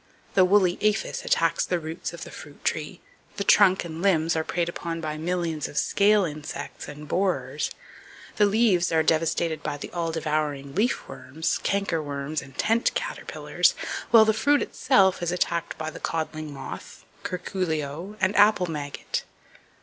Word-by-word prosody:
The 190 - +6
woolly 185 -1 +3
aphis 215 0 0
attacks 165 -1 +2
the 180 - 0
roots 160 +1 -5
of 170 - -8
the - - -9
fruit 145 -1 -12
tree, 155 +3 -2 0.4
the 200 - -1
trunk 190 -2 +5
and 165 0 -6
limbs 170 -4 +2
are 160 - 0
preyed 170 +1 -1
upon 170 -1 -4
by 155 -2 -3
millions 165 -1 -2
of 150 - -9
scale 205 0 +4
insects 150 -1 -6
and 150 +1 -9
borers, 150 -6 0 0.7
the 210 -1 +5
leaves 200 -5 +3
are 160 -1 +3
devastated 160 0 +1
by 145 - -3
the - - -8
all 170 -2 -2
devouring 150 -3 -2
leaf 220 - 0
worms, 160 +5 -3
canker 195 -5 0
worms 145 +1 -3
and 135 0 -14
tent 225 +2 +2
caterpillars, - - 0 0.3
while 225 -2 +8
the 220 - +3
fruit 285 +7 +3
itself 195 -9 +3
is 175 -1 0
attacked 170 -1 -1
by 155 0 -4
the - - -9
codling 155 -1 -3
moth, 135 -1 -9 0.2
curculio 175 0 -3
and 190 +1 +1
apple 205 -3 +5
maggot. 150 -4 -4
170 Hz, 160 wpm, -26 LUFS, 155-195 Hz, 0.7 s, while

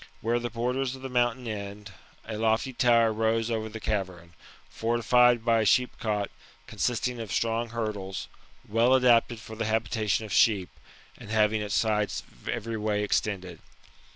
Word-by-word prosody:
Where 120 +2 +1
the 120 0 -3
borders 125 +3 -2
of 130 - -13
the 135 - -4
mountain 120 0 0
end, 100 -1 -6 0.3
a 110 - -5
lofty 110 +4 0
tower 115 -2 +4
rose 115 +1 0
over 110 -1 -2
the 110 +1 -7
cavern, 90 -6 -3 0.3
fortified 120 +1 +3
by 115 -1 +3
a - - +2
sheepcot 105 -2 +1 0.3
consisting 125 0 -2
of 110 -4 -6
strong 115 0 0
hurdles, 105 -5 -4 0.4
well 115 +4 +4
adapted 120 -2 +4
for 110 - -10
the 115 0 -2
habitation 110 -1 0
of 105 - -6
sheep, 100 -5 +3 0.5
and - - -11
having 110 0 +2
its 105 -1 -2
sides 105 -2 0 0.3
every 115 +1 -3
way 105 -1 0
extended. 95 -4 -2
110 Hz, 155 wpm, -27 LUFS, 105-120 Hz, 0.5 s, tower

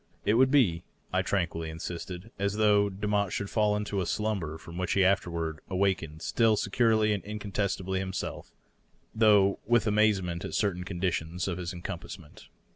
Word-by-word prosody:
It 105 - +3
would 130 +3 +5
be, 110 -13 +3 0.3
I - - +3
tranquilly 80 -1 -1
insisted, 90 +5 -6
as 100 +1 0
though 105 -1 +4
Demotte 100 0 -1
should 100 - -3
fall 105 -2 +2
into 105 -1 -2
a 90 - -2
slumber 95 -7 -2
from 85 +2 -9
which 90 - 0
he 95 -1 +4
afterward 85 -4 0
awaked 95 -1 +1 0.2
still 115 -2 +3
securely 110 0 +2
and 100 - -3
incontestably 100 -2 -2
him 95 0 -3
self, - - -5 0.6
though 105 -3 +4
with 120 -1 +3
amazement 105 -5 +2
at - - -4
certain 90 -4 0
conditions 90 -2 -2
of 90 -1 -3
encompassment. 85 -1 -7
100 Hz, 155 wpm, -29 LUFS, 90-105 Hz, 0.6 s, would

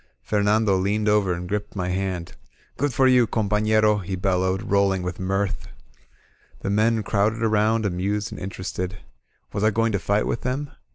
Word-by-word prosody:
Fernando 105 -1 +2
leaned 105 +3 0
over 105 -3 +3
and 90 0 -3
gripped 105 +2 -3
my 90 -2 -2
hand. 90 -2 -3 0.4
Grood 145 +2 0
for 130 +2 +2
you, 125 -2 +5
com 110 -2 -1
pafleroV* 105 0 +2
he 95 - -2
bellowed, 95 0 0
rolling 100 -2 +2
with 90 -1 -4
mirth. 95 +1 -2 0.9
The 100 - -2
men 110 +2 +2
crowded 105 +3 0
around, 110 0 +2
amused 100 +3 -1
and - - -8
interested. 95 0 -4 0.6
Was 100 - -2
I 110 - +5
going 115 +1 +1
to 100 - 0
fight 100 +2 +1
with - - -2
them? 135 +3 -3
105 Hz, 170 wpm, -24 LUFS, 95-110 Hz, 0.9 s, you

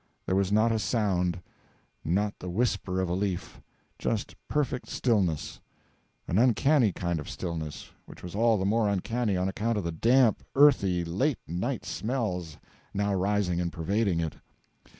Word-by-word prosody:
There 95 - 0
was 95 0 +1
not 110 +2 +4
a 110 - +1
sound, 90 -7 0 0.6
not 100 +5 0
the 90 - -6
whisper 95 -2 0
of 95 - 0
a 85 - -1
leaf; 95 -1 -3 0.4
just 110 -2 -2
perfect 145 -4 -1
stillness; 95 - 0 0.7
an 90 - +1
uncanny 125 0 +4
kind 85 -2 -2
of 75 - -7
stillness, 80 -4 -5 0.2
which - - -13
was 90 - -7
all 115 +1 +3
the 95 - -1
more 110 +1 +2
uncanny 105 +1 0
on 90 +1 0
account 110 +4 -1
of 105 - -1
the 85 - -2
damp, 115 +7 +3
earthy, 100 -12 +4
late 110 - 0
night 100 - -3
smells 90 - -3 0.4
now 100 0 +1
rising 95 -2 +1
and 85 -1 -2
pervading 95 +2 0
it. 80 -2 -3
100 Hz, 155 wpm, -28 LUFS, 90-115 Hz, 0.7 s, not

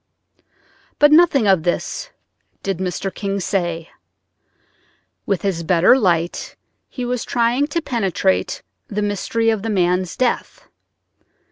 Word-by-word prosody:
But 295 0 +5
nothing 305 -6 +5
of 190 -4 +4
this 175 - -2 0.5
did 195 -3 -2
Mr. 190 +1 -3
King 200 -1 -3
say. 175 -4 -2 1.4
With 195 -3 -1
his 190 -4 -1
better 170 +6 +4
light 175 -8 0 0.3
he 250 - -5
was 245 -1 -2
trying 245 +4 +1
to 325 +2 -2
penetrate 195 - -1 0.2
the 210 0 -2
mystery 225 +3 0
of 220 -3 -2
the 225 - -3
man's 180 -3 0
death. 255 - -2
200 Hz, 120 wpm, -20 LUFS, 180-245 Hz, 1.4 s, But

